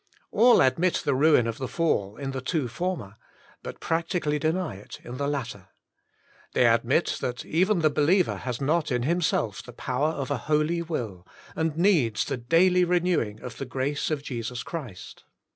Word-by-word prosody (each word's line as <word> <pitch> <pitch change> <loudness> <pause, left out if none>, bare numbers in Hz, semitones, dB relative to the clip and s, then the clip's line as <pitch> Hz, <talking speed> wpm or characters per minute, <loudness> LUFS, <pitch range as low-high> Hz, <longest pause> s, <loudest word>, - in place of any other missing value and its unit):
All 235 +3 +6
admit 165 +7 +2
the - - +2
ruin 140 -2 +4
of 115 -1 -4
the 130 - -3
fall 125 -8 -1
in 135 -1 -4
the 135 -1 -4
two 145 -1 -1
former, 120 - -4 0.4
but - - -8
practically 165 -2 -1
deny 160 - -1
it 100 - -11
in 120 +1 -7
the 140 +1 -1
latter. 115 -10 -4 0.9
They - - +4
admit - - +2
that 125 0 -3
even 185 +3 +2
the 155 -1 +3
believer 165 +6 +2
has 125 -2 -4
not 155 +2 0
in 125 -1 0
himself 150 - 0
the 125 - -12
power 130 +4 -1
of 140 -4 -4
a - - +1
holy 155 +3 +2
will, 115 - -5 0.3
and 160 -1 -1
needs 165 - +2
the - - -3
daily 175 +9 +3
renewing 175 -12 0
of 125 - -8
the 135 - -3
grace 135 +3 -2
of 150 -3 -2
Jesus 120 -2 -4
Christ. 130 - -8
145 Hz, 175 wpm, -26 LUFS, 125-170 Hz, 0.9 s, All